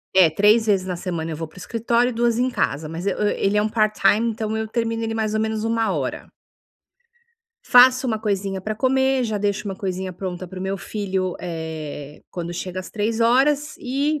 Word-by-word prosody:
é, 180 -4 +7
3 210 +6 +4
vezes 195 -3 +2
na 180 -1 -3
semana 170 -2 -4
eu - - -3
vou 165 - -4
para 155 - -23
o - - -8
escritório 235 +4 +1
e - - -3
2 235 0 +1
em 255 +1 +2
casa, 155 - -1
mas 170 +4 -5
eu 195 - 0
ele 200 +1 0
é - - +4
um 215 - 0
part-time, 215 0 +2
então 220 -1 -3
eu 220 0 -2
termino 230 0 -1
ele 225 0 -2
mais 215 -1 -1
ou 215 - +1
menos 220 0 -1
13:00. 220 - -1 1.4
Faço 255 - +6
uma 220 -2 0
coisinha 195 -3 -2
pra 215 +3 -3
comer, 265 +1 +2
já 215 -2 -1
deixo 205 +1 -1
uma 195 -1 -4
coisinha 185 -1 -3
pronta 185 0 -5
para 185 +1 -9
o 185 - -5
meu 195 +1 -2
filho, 190 -2 -2
eh, 160 -4 -6
quando 175 -1 -5
chega 185 +1 -4
às 185 - -10
15:00 240 +7 +2
e, 280 +4 -1
210 Hz, 205 wpm, -22 LUFS, 185-230 Hz, 1.4 s, é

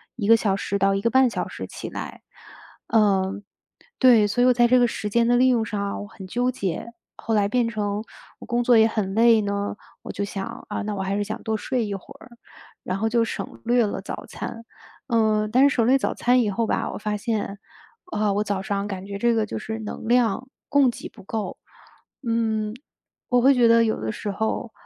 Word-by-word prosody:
1 210 -5 -3
个 230 - +8
小 210 -3 +1
时 200 0 -2
到 195 0 +3
1 195 - -1
个 230 +2 +1
半 260 -1 +5
小 - - -3
时 - - -7
起 - - -8
来。 - - -7 0.7
嗯， 200 -2 +2 0.6
对， 240 -5 +6
所 205 +4 0
以 250 - +5
我 250 - +6
在 240 0 +4
这 250 +1 +5
个 245 - +4
时 210 -2 -4
间 235 +2 +2
的 240 - +4
利 255 +1 +5
用 235 -3 +2
上 210 -2 -3
啊， 200 - -3
我 205 - -7
很 205 -2 -11
纠 245 +6 0
结。 230 -1 -4 0.2
后 225 - -3
来 205 -1 +3
变 240 +1 +1
成 210 -2 -2 0.4
我 - - -10
工 240 0 0
作 240 -1 +5
也 220 0 +6
很 210 -4 -2
累 230 +1 +5
呢， 200 0 -2 0.3
我 - - -10
就 200 - -3
想， 200 -1 -6
啊， - - -3
那 210 0 -3
我 195 - -3
还 195 +1 -1
是 - - 0
想 215 +1 -6
多 220 -1 -1
睡 240 +2 -1
一 205 - -4
会 195 - -6 0.2
儿， - - -14 0.5
然 185 - -2
后 220 +3 0
就 230 0 +2
省 - - -6
略 240 0 +3
了 205 - -3
早 - - -7
餐。 230 - -7 0.4
呃， 215 -3 +2
但 265 +4 +5
是 - - -2
省 230 - +2
略 260 +3 +5
早 - - -1
餐 250 +1 +3
以 220 - 0
后 225 +4 0
吧， - - -1
我 - - -5
发 210 0 -2
现， 205 -2 -3 0.5
啊， 215 - -1
我 205 - 0
早 200 -2 -2
上 200 0 -2
感 195 -2 -6
觉 200 0 -6
这 235 +2 +3
个 220 -1 +1
就 - - -5
是 220 +1 -5
能 220 +1 -7
量 240 0 +2 0.2
供 285 -3 +4
给 235 - -7
不 - - -15
够。 215 +2 -4 0.7
嗯， 220 -2 0 0.6
我 245 -1 +3
会 270 +3 +6
觉 245 -3 +4
得 230 0 +5
有 220 -1 0
的 110 0 -2
时 205 - -4
候 220 +3 -2
220 Hz, 240 characters per minute, -24 LUFS, 205-240 Hz, 0.7 s, 个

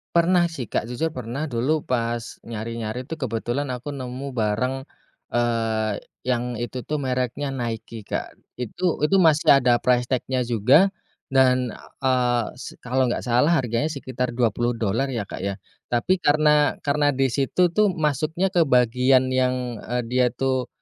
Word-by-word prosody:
Pernah 175 +1 +4
sih 130 -9 -5
Kak, - - -1
jujur 140 +7 -1
pernah 125 +5 -4
dulu 140 +4 -1
pas 120 -1 0 0.2
nyari-nyari 115 +2 -5
tuh 160 - -4
kebetulan 130 +1 -2
aku 130 +4 -5
nemu 130 +1 -6
bareng 125 +4 -1 0.5
eee, 115 -3 0 0.2
yang 125 -2 -1
itu 120 +1 -4
tuh 150 -1 -2
mereknya 130 +1 -2
Nike, 115 -4 -5
Kak. - - -4 0.2
Itu 170 - -1
itu 195 - +2
masih 155 -3 +6
ada 120 -1 +4
price 125 +1 +1
tag-nya 130 0 0
juga 125 - +4 0.4
dan 130 -2 +3 0.3
eee, 125 -3 +2
se - - -8
kalau 130 +1 +1
enggak 120 - -2
salah 125 +8 +3
harganya 125 +1 0
sekitar 130 -5 -4
$20 120 0 0
ya 120 -5 -2
Kak - - -8
ya. 100 +1 -2 0.3
Tapi 150 +10 +1
karena 150 -2 +3
karena 145 -1 +2
di 135 -1 +1
situ 165 +7 +1
tuh 210 +3 +3
masuknya 155 +4 0
ke 170 -5 +3
bagian 125 +1 +3
yang 125 -2 0
eee, 125 +3 -3
dia 125 0 +3
tuh 130 0 -1
125 Hz, 150 wpm, -23 LUFS, 120-140 Hz, 0.5 s, masih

